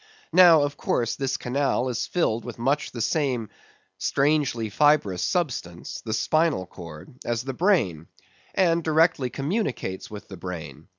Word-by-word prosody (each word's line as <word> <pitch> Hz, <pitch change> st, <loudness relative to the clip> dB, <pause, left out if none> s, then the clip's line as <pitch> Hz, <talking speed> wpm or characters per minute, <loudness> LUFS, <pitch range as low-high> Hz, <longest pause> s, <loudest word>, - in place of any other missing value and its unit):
Now, 170 Hz, -5 st, +8 dB
of 145 Hz, 0 st, -3 dB
course, 115 Hz, -1 st, 0 dB
this 135 Hz, -1 st, -1 dB
canal 130 Hz, 0 st, 0 dB
is 125 Hz, -3 st, -2 dB
filled 120 Hz, -10 st, 0 dB
with 120 Hz, -1 st, -7 dB
much 135 Hz, +5 st, 0 dB
the 120 Hz, -, -5 dB
same 125 Hz, -5 st, 0 dB, 0.5 s
strangely 140 Hz, -5 st, +1 dB
fibrous 140 Hz, -8 st, +3 dB
substance—the 115 Hz, -, -3 dB
spinal 155 Hz, -, +1 dB
cord—as 90 Hz, +8 st, -6 dB
the 135 Hz, 0 st, -4 dB
brain; 120 Hz, -, +1 dB, 0.5 s
and 170 Hz, -3 st, +3 dB
directly 160 Hz, -4 st, +2 dB
communicates 140 Hz, -, -3 dB
with 105 Hz, -1 st, -9 dB
the 95 Hz, -, -9 dB
brain. 85 Hz, -3 st, -7 dB
130 Hz, 130 wpm, -25 LUFS, 105-155 Hz, 0.5 s, Now